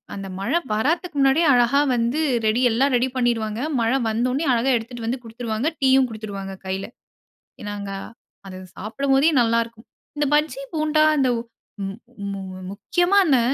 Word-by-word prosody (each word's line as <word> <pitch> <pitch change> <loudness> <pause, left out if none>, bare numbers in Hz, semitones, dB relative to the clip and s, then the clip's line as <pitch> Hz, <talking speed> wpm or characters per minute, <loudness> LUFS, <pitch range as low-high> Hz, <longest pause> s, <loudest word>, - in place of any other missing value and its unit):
அந்த 195 -1 -6
மழை 320 +13 +1
வர்றத்துக்கு 310 - -1
முன்னாடியே 275 +5 +4
அழகா 245 +3 +4 0.2
வந்து 235 +5 0 0.3
ரெடி 220 +3 +2
எல்லாம் 265 +4 +2
ரெடி 250 +2 +2
பண்ணிருவாங்க. 230 -3 0 0.2
மழை 230 +4 +2
வந்தவுனே 250 +7 0
அழகா 245 +3 +2
எடுத்துட்டு 230 +1 -7
வந்து 245 +1 -2
குடுத்துருவாங்க. 230 +3 -3
டீயும் 265 -1 +4
குடுத்துருவாங்க 200 -3 -6
கையில. 190 +1 -3 0.9
நாங்க 200 -1 -6 0.6
அது 185 -1 -8 0.2
சாப்பிடும்போதே 270 +7 +2
நல்லாயிருக்கும். 230 0 -1 0.3
இந்த 295 - +1
பஜ்ஜி 295 -3 0
போண்டா 310 0 +2 0.2
இந்த 260 -2 +3 0.6
மு 195 - -3 0.4
மு 195 - -5 0.3
முக்கியமா 350 - +1
இந்த 270 -5 +4
240 Hz, 135 wpm, -22 LUFS, 220-275 Hz, 0.9 s, முன்னாடியே